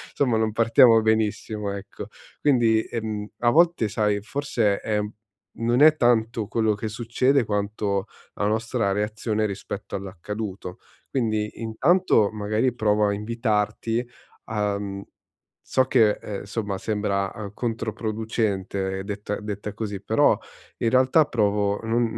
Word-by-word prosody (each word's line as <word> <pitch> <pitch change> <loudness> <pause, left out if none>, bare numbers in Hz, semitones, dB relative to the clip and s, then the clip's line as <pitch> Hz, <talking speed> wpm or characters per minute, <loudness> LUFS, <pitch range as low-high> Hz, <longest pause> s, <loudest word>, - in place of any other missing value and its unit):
somma 125 -5 +2
non 110 0 +1
partiamo 115 +1 +6
benissimo 110 -1 0
ecco. 100 - -8 0.3
Quindi, 120 -6 +3
ehm, 110 -2 -4
a 120 - +4
volte 170 -6 +4
sai 105 -1 +1
forse 115 -4 0
è 105 -1 -1 0.6
non 120 +4 +2
è 155 0 +7
tanto 115 -2 +2
quello 110 -2 +1
che 110 +2 -4
succede 120 +4 +1
quanto 100 -1 -1 0.3
la 105 - -1
nostra 110 0 0
reazione 110 +1 -1
rispetto 100 0 -5
all'accaduto. 95 0 -6 0.3
Quindi 110 -4 -1
intanto 115 - +3
magari 110 +4 0
provo 105 -2 +2
a 100 - +1
invitarti 115 +2 -1 0.4
a 105 -2 -1 0.8
so 130 - +2
che, 115 -5 +4
ehm, 100 -2 -5
insomma 100 -1 -3
sembra, 100 -2 -1
eh, 105 -3 -7
controproducente 110 -4 -2
detta 105 0 -4
detta 105 0 -5
così, 105 -3 -5
però - - +3 0.4
in 115 - +1
realtà 130 +5 +4
provo, 105 -4 +1
non 115 +2 +1
110 Hz, 125 wpm, -24 LUFS, 105-115 Hz, 0.8 s, è